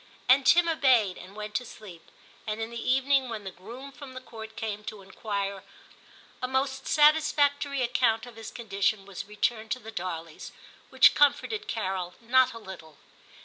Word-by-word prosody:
And 260 +2 +5
Tim 345 0 +6
obeyed 255 - +3
and 185 +3 -12
went 210 0 -6
to 250 - -1
sleep; 205 -8 -13 0.4
and 215 +1 -3
in 225 +1 -4
the 235 +1 -2
evening 270 0 +2
when 220 -3 -5
the 190 - -6
groom 235 +10 -10
from 270 -1 -11
the - - -5
Court 220 -3 -10
came 210 -1 -4
* - - -20
to 215 -2 -7
enquire,' 200 0 -4 0.8
a 255 - -1
most 265 +1 -1
satisfactory 290 -2 +3
account 235 -2 +1
of 245 -2 -12
his 225 -1 -8
condition 200 -2 -1
was 200 0 -7
returned 220 +2 -2
to 255 - -7
the 225 -1 -10
Darleys, 170 -5 -6 0.4
which - - +6
comforted 355 +9 +2
Carol 190 -4 -3
not 255 +2 +3
a - - -8
little. 185 -8 -11
225 Hz, 175 wpm, -28 LUFS, 200-260 Hz, 0.8 s, Tim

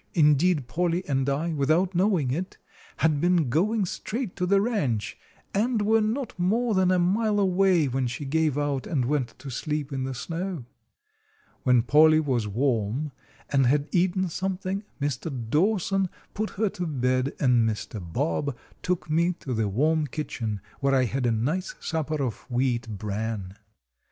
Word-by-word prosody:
Indeed, 150 -2 +4
Polly 175 +4 0
and 135 -1 +1
I, 155 +5 -1
without 155 +6 +2
knowing 180 -7 +2
it, 180 +7 -3 0.4
had 155 -3 +2
been 175 -6 +3
going 200 - +2
straight 225 +4 -4
to 180 -1 0
the 200 +1 +4
ranch, 175 - -1 0.4
and 220 +1 +1
were 220 +2 +4
not 225 -1 -2
more 220 +6 +1
than 190 -2 +3
a 185 - +3
mile 205 +4 +2
away 185 -4 +3
when 130 0 -1
she 120 +4 -5
gave 155 0 +1
out 145 -2 -1
and 135 -7 0
went 130 -3 -1
to 135 -1 -8
sleep 150 +2 -3
in 135 -1 -2
the 130 0 -3
snow. 165 0 -4 1.0
When 125 -3 +4
Polly 155 +5 +6
was 130 -8 0
warm 120 +4 0 0.4
and 135 -3 +4
had 145 +3 +2
eaten 185 +1 +2
something, 190 +2 -3 0.2
Mr. 145 +2 -2 0.2
Dawson 195 +2 +2 0.2
put 215 +1 -2
her 215 0 +2
to 180 -2 -4
bed, 130 -2 0
and 120 -4 +3
Mr. 105 -1 -5
Bob 140 - -2 0.2
took 180 -1 -1
me 170 +3 +2
to 140 -6 -6
the 110 -2 0
warm 150 +9 +1
kitchen, 115 -8 -4 0.2
where 140 -1 +2
I 130 - +4
had 125 +1 -1
a - - +3
nice 150 +12 -1
supper 155 -2 -2
of 120 -2 -5
wheat 120 -2 0
bran. 105 -2 -4
150 Hz, 160 wpm, -26 LUFS, 130-185 Hz, 1.0 s, Polly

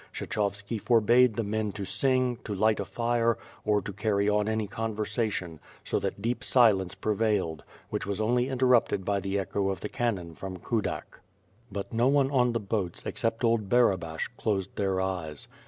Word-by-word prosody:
Kshechovski 100 +1 -2
forbade 120 +1 +4
the 115 - 0
men 105 0 -1
to 100 -2 -5
sing, 125 +5 +1
to 105 - -4
light 110 +2 +2
a 100 - -2
fire, 115 +1 +1 0.3
or 105 -1 +2
to 100 - -5
carry 100 -1 0
on 105 0 +2
any 110 -1 0
conversation, 105 -5 -2 0.2
so - - -1
that 100 - -4
deep 120 +2 -1
silence 105 -9 +4
prevailed, 105 -7 0 0.3
which - - -2
was 100 0 -2
only 120 +4 +1
interrupted 125 -7 +2
by 100 -1 +1
the 95 0 -2
echo 100 0 -1
of 95 - -3
the 105 - -4
canon 100 -9 -2
from 95 +2 -7
Kudak. 110 +3 -3 0.5
But 100 +2 -5
no 115 +2 +3
one 140 0 +3
on 125 -3 +3
the* 115 - 0
boats, 100 -4 -3
except 115 +1 -2
old 115 -4 +2
Barabash, 95 -10 +2
closed 100 -4 -1
their 95 -2 0
eyes. 90 -6 -3
105 Hz, 170 wpm, -28 LUFS, 100-115 Hz, 0.5 s, forbade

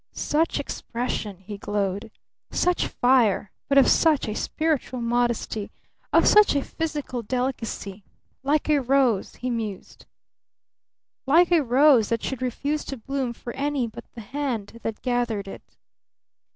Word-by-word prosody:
Such 320 +3 0
expression!" 230 -4 -4
he 200 +2 -9
glowed. 205 +1 -2 0.4
"Such 360 0 +1
fire! 240 -6 +2 0.2
But 280 - +3
of 275 - +7
such 315 -6 +3
a 215 - -2
spiritual 300 0 -1
modesty! 235 -3 -1 0.4
Of - - +5
such 420 -7 +6
a 280 - +1
physical 295 -6 -4
delicacy! 230 -4 -3 0.4
Like 285 +3 +1
a 300 -2 +3
rose," 255 -5 +2
he 250 0 -3
mused, 220 -5 -6 1.2
"like 335 +5 +5
a 340 -2 +5
rose 260 -3 +4
that 230 -1 -1
should 265 -2 -3
refuse 280 +4 -2
to 270 - -5
bloom 265 +1 -3
for 240 0 -8
any 280 -2 -1
but 225 - -9
the 235 - -7
hand 230 -3 -4
that 225 -1 -5
gathered 240 -5 -1
it." - - -11
245 Hz, 140 wpm, -25 LUFS, 225-280 Hz, 1.2 s, of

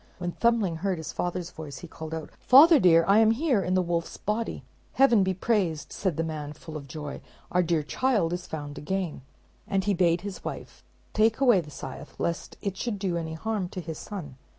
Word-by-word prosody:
When 175 0 -3
Thumbling 220 -6 +1
heard 190 +1 -1
his 160 - -6
father's 180 0 -3
voice, 150 -5 -8
he 175 - -9
called 160 0 -7
out, 160 -2 -7
"Father 295 +4 +8
dear, 165 -5 +6
I 200 +2 +6
am 220 -1 +6
here, 245 -1 +2
in 185 0 0
the 185 - +3
wolf's 170 -1 -2
body!" 220 +2 -2 0.3
"Heaven 250 -6 +5
be 190 0 +1
praised," 185 -7 0
said 185 -6 -1
the 165 - +1
man, 150 -2 -5
full 155 +1 -10
of 140 -2 -7
joy, 145 +2 -6 0.3
"our 180 - +3
dear 165 -3 +1
child 205 - +1
is 180 0 -4
found 145 -2 -6
again;" 180 -2 -3 0.5
and 195 -1 +1
he 205 - +1
bade 170 -2 +2
his 200 0 -7
wife - - -7 0.3
take 220 +2 +3
away 240 -9 +5
the 150 - -12
scythe, 145 - -9
lest 170 0 -3
it 195 -2 -2
should 230 -2 -2
do 190 -3 -1
any 160 -1 -3
harm 205 0 -2
to 185 - -6
his 160 -3 -6
son. 160 -11 -7
180 Hz, 210 wpm, -27 LUFS, 160-210 Hz, 0.5 s, Father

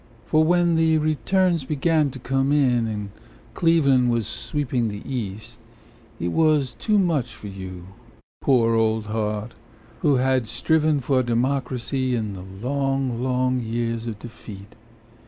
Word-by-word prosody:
For 155 0 +3
when 175 0 +3
the 160 -1 +3
returns 165 +2 +1
began 150 +2 +1
to 130 - -9
come 135 +2 0
in 125 -6 +3
And 105 -2 -4 0.4
Cleveland 140 -7 +3
was 115 -2 0
sweeping 130 -4 -2
the 105 -1 -6
East 110 -6 -5 0.6
It 85 - -1
was 150 - +2
too 215 -2 +2
much 160 -11 0
for 105 - -10
you, 95 -2 -8 0.6
poor 120 -4 +3
old 110 -1 +1
heart, 110 +1 -3 0.5
Who 145 -3 +3
had 130 -2 +1
striven 150 +4 +1
for 130 +1 +2
democracy 130 +1 -1
In 110 -3 -3
the 95 - -8 0.3
long, 135 -3 -1
long 130 0 +1
years 115 0 -2
of 110 -3 -4
defeat. 105 -3 -11
130 Hz, 135 wpm, -23 LUFS, 115-145 Hz, 0.6 s, For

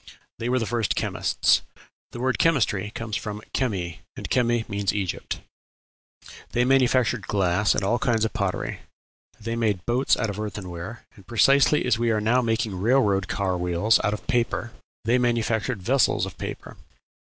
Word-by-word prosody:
They 120 +1 -2
were 130 - +2
the 115 - 0
first 115 -2 0
chemists. - - +2 0.5
The 120 - -8
word 130 +1 0
"chemistry" 110 -11 +2
comes 115 -2 -4
from 105 -1 -4
chemi, 95 - -2 0.2
and - - -6
chemi 120 -2 +1
means 100 -2 -1
Egypt. 95 -4 -3 1.1
They 120 +1 +2
manufactured 125 -3 +2
glass 100 0 +2
and - - -1
all 120 +5 +1
kinds 115 -3 +1
of 110 - -3
pottery; 100 -5 -2 0.6
they 115 +2 -3
made 105 -6 0
boats 125 +3 +2
out 110 -3 -1
of 105 - -7
earthenware; 100 0 -6
and, 95 - -17
precisely 140 +5 +4
as 120 -3 +2
we 120 0 +1
are 110 -1 +2
now 115 +4 +2
making 115 -4 -1
railroad 100 -4 +2
car 95 -3 -1
wheels 90 +5 +2
of 105 0 -2
paper, 120 -2 0 0.3
they 120 +3 +3
manufactured 115 -2 0
vessels 130 +6 +2
of - - -8
paper. - - -7
115 Hz, 160 wpm, -25 LUFS, 100-120 Hz, 1.1 s, precisely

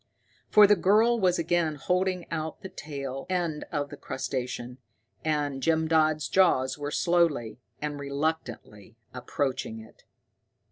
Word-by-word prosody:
For 210 -1 +8
the 205 +1 +5
girl 215 +6 +3
was 180 -3 +2
again 170 -2 0
holding 180 +4 0
out 160 -1 -4
the 190 - -6
tail 140 -6 -6
end 170 -5 -1
of 145 -2 -2
the - - -9
crustacean, 125 -1 -4 0.4
and 145 -3 -1
Jim 160 +2 +2
Dodd's 155 -2 +2
jaws 135 -9 +3
were 145 0 -4
slowly 150 -9 +1 0.2
and 145 -1 -3
reluctantly 140 -7 -4 0.2
approaching 125 -2 -3
it. 110 0 -15
155 Hz, 130 wpm, -27 LUFS, 135-175 Hz, 0.4 s, For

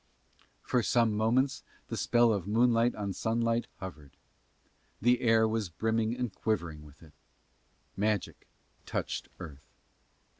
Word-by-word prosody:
For 125 - +1
some 115 -2 +2
moments 120 +6 +1 0.3
the - - -3
spell 120 -1 +3
of 100 -3 -3
moonlight 115 +2 +3
on 100 -2 -3
sunlight 115 +2 0
hovered: 80 -7 -10 0.8
the 120 +3 +3
air 115 -2 +4
was 110 -3 -1
brimming 110 +6 -1
and 125 -5 -3
quivering 85 -9 -2
with 75 +1 -16
it: 80 -3 -17 0.8
magic 105 -1 -2 0.4
touched - - -3
earth. 75 -6 -10
110 Hz, 120 wpm, -30 LUFS, 95-115 Hz, 0.8 s, air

